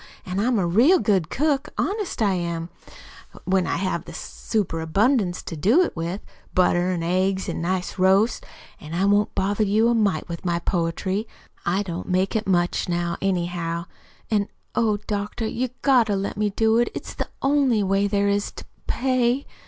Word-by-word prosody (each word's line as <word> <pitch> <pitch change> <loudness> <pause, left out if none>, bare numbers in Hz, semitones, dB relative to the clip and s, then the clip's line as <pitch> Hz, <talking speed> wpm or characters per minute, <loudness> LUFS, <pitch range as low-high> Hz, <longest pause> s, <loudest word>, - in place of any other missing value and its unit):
An' 185 +1 -3
I'm 240 +3 +2
a 190 - +1
real 235 - +5
good 190 - +1
cook, 295 0 0
honest 400 - -1
I 200 -2 +3
am, 170 -2 -3 0.7
when 190 -1 +1
I - - 0
have 185 -2 -2
a - - -8
super 195 -7 -3
abundance 195 - +1
to 165 - -6
do 225 - +4
it - - -3
with 170 +4 -3 0.3
butter, 180 0 +3
an' 175 -2 -1
eggs, 190 +2 0
an' - - -3
nice 180 +2 -2
roasts. 195 +5 +3 0.4
An' 155 +1 -7
I 190 +3 +2
won't 205 +1 +2
bother 200 +2 +1
you 215 +3 +3
a - - +3
mite 205 -8 +1
with 170 -1 -6
my 175 -2 0
poetry. 185 +5 -1 0.4
I 190 +4 +1
don't 175 -1 -5
make 185 +3 +1
it 220 -2 -1
much 175 -1 +1
now, 175 0 -1
anyhow. 175 -3 -1 0.5
An' 205 -2 +2 0.3
oh, 220 -3 +2
doctor, 210 +2 -3
you've 250 +3 -3
GOT 255 -5 +5
to 205 - +1
let 195 +1 -2
me 210 0 +1
do 220 +3 +2
it; 240 - +2
it's - - -6
the - - -4
only 270 -6 +3
way 195 +1 +2
there 200 0 +1
is 200 0 0
to - - -9
p - - -25 0.2
pay." 255 0 +1
195 Hz, 185 wpm, -23 LUFS, 175-220 Hz, 0.7 s, real